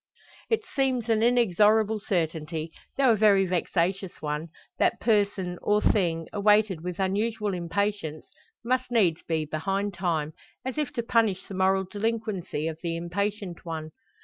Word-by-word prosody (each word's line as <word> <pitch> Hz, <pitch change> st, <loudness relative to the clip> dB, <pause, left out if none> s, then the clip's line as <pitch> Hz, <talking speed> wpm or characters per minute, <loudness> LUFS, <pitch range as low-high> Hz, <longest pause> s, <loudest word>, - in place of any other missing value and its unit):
It 445 Hz, -1 st, +1 dB
seems 260 Hz, -4 st, 0 dB
an 220 Hz, -1 st, +3 dB
inexorable 220 Hz, -2 st, +3 dB
certainty 160 Hz, -4 st, -2 dB, 0.3 s
though 270 Hz, -3 st, +5 dB
a -, -, +4 dB
very 205 Hz, -2 st, +5 dB
vexatious 180 Hz, +1 st, -1 dB
one 150 Hz, +1 st, -3 dB, 0.3 s
that -, -, +2 dB
person, 200 Hz, -5 st, +1 dB
or 210 Hz, 0 st, +3 dB
thing, 170 Hz, -6 st, +1 dB
awaited 205 Hz, -4 st, +3 dB
with 180 Hz, 0 st, -5 dB
unusual 210 Hz, +2 st, 0 dB
impatience, 175 Hz, -2 st, -2 dB, 0.4 s
must 255 Hz, +1 st, 0 dB
needs 195 Hz, -9 st, +2 dB
be 160 Hz, -2 st, -1 dB
behind 195 Hz, +7 st, -2 dB
time 165 Hz, -4 st, -1 dB, 0.3 s
as 260 Hz, +3 st, -3 dB
if 295 Hz, -4 st, -1 dB
to 235 Hz, -, -2 dB
punish 225 Hz, -5 st, +1 dB
the -, -, -8 dB
moral 190 Hz, +1 st, +2 dB
delinquency 205 Hz, -6 st, -2 dB
of 160 Hz, -1 st, -5 dB
the 170 Hz, -2 st, -2 dB
impatient 190 Hz, +2 st, -3 dB
one. 160 Hz, -2 st, -5 dB
195 Hz, 145 wpm, -27 LUFS, 170-220 Hz, 0.4 s, though